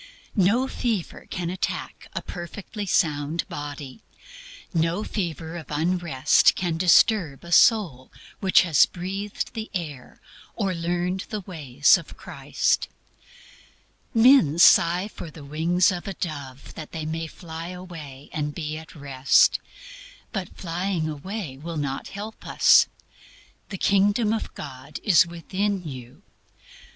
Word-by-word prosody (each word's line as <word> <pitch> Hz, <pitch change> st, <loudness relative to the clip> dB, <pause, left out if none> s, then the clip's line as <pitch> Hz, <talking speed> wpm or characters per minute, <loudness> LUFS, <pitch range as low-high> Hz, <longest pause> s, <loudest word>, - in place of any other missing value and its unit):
No 220 Hz, +6 st, +3 dB
fever 225 Hz, -9 st, -3 dB
can 175 Hz, -1 st, -3 dB
attack 185 Hz, -, -4 dB
a -, -, -4 dB
perfectly 200 Hz, +4 st, -7 dB
sound 150 Hz, -1 st, 0 dB
body; 145 Hz, +3 st, -7 dB, 0.7 s
no 165 Hz, +4 st, +1 dB
fever 170 Hz, -6 st, -4 dB
of 160 Hz, -5 st, -9 dB
unrest 155 Hz, -3 st, +3 dB
can 175 Hz, -3 st, -1 dB
disturb 175 Hz, -3 st, +3 dB
a 170 Hz, -, -10 dB
soul 170 Hz, -, +4 dB, 0.3 s
which 190 Hz, -1 st, +5 dB
has 165 Hz, -5 st, +5 dB
breathed 195 Hz, +3 st, -5 dB
the 220 Hz, 0 st, -5 dB
air 150 Hz, -8 st, -6 dB, 0.4 s
or 195 Hz, -4 st, -1 dB
learned 175 Hz, +2 st, -2 dB
the 210 Hz, -2 st, -4 dB
ways 145 Hz, -7 st, +3 dB
of -, -, -12 dB
Christ. -, -, -1 dB, 1.2 s
Men 225 Hz, -, +5 dB
sigh 175 Hz, +2 st, +6 dB
for 175 Hz, -5 st, -9 dB
the 150 Hz, -2 st, -12 dB
wings 170 Hz, +6 st, +2 dB
of 180 Hz, +2 st, -5 dB
a 195 Hz, -, -4 dB
dove 140 Hz, -6 st, -6 dB
that 155 Hz, -, -9 dB
they 160 Hz, -1 st, -4 dB
may 160 Hz, +1 st, -3 dB
fly 165 Hz, 0 st, -8 dB
away 165 Hz, -7 st, -9 dB
and 150 Hz, -1 st, -3 dB
be 155 Hz, -1 st, -4 dB
at 160 Hz, -, -14 dB
Rest. 140 Hz, -2 st, +3 dB, 0.7 s
But 195 Hz, -6 st, -5 dB
flying 175 Hz, -1 st, -2 dB
away 155 Hz, -1 st, -6 dB
will 165 Hz, +2 st, -6 dB
not 140 Hz, -2 st, -3 dB
help 210 Hz, +2 st, -8 dB
us. -, -, +6 dB, 0.8 s
"The 195 Hz, -, -5 dB
Kingdom 205 Hz, +4 st, +2 dB
of 225 Hz, -, -3 dB
God 140 Hz, 0 st, -8 dB
is 180 Hz, -4 st, +5 dB
within 185 Hz, +2 st, -3 dB
you." 125 Hz, -3 st, -10 dB
170 Hz, 130 wpm, -25 LUFS, 150-190 Hz, 1.2 s, sigh